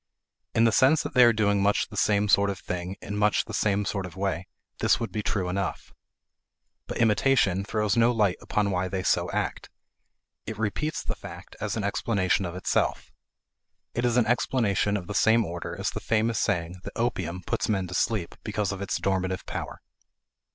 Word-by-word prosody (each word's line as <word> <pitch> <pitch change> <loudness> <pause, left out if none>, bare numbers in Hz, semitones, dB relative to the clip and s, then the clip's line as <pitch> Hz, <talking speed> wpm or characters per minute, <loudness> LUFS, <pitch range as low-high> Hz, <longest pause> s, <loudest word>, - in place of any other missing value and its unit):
In 115 - +4
the 115 - +5
sense 135 +7 +4
that - - -5
they 125 - +7
are 120 - +7
doing 105 -2 +2
much 100 +1 +2
the 105 - -10
same 105 0 +2
sort 100 0 +4
of 100 - -3
thing 90 +1 -5
in 100 - -5
much 105 0 +2
the - - -8
same 105 -1 +1
sort 95 -2 -2
of 90 - -13
way, 95 -2 -2 0.3
this - - +3
would 115 -4 -3
be 105 - -2
true 100 -3 -1
enough. 95 +1 -3 0.9
But - - -4
"imitation" 105 -4 +3
throws 105 0 0
no 115 +1 +4
light 105 -6 +2
upon 105 -1 0
why 95 0 0
they 95 0 -3
so - - +1
act; - - -3 0.8
it 110 -1 -5
repeats 110 +9 -2
the - - -2
fact - - -11
as 105 +1 -2
an 110 - -2
explanation 100 -2 0
of 85 0 -5
itself. 90 - -1 0.8
It 120 - -1
is 120 0 +2
an 120 - +4
explanation 110 -4 +1
of 90 - -6
the 105 - -5
same 110 +3 +4
order 85 +1 -6
as 100 - -1
the - - -5
famous 115 0 +1
saying 85 +1 -1
that 100 - -7
opium 95 -7 -2
puts - - -1
men 95 -3 +1
to 90 - -7
sleep 105 -2 0
because 105 -2 -1
of 95 0 -5
its 100 - -1
dormitive 95 -1 -1
power. - - -6
100 Hz, 195 wpm, -27 LUFS, 95-110 Hz, 0.9 s, they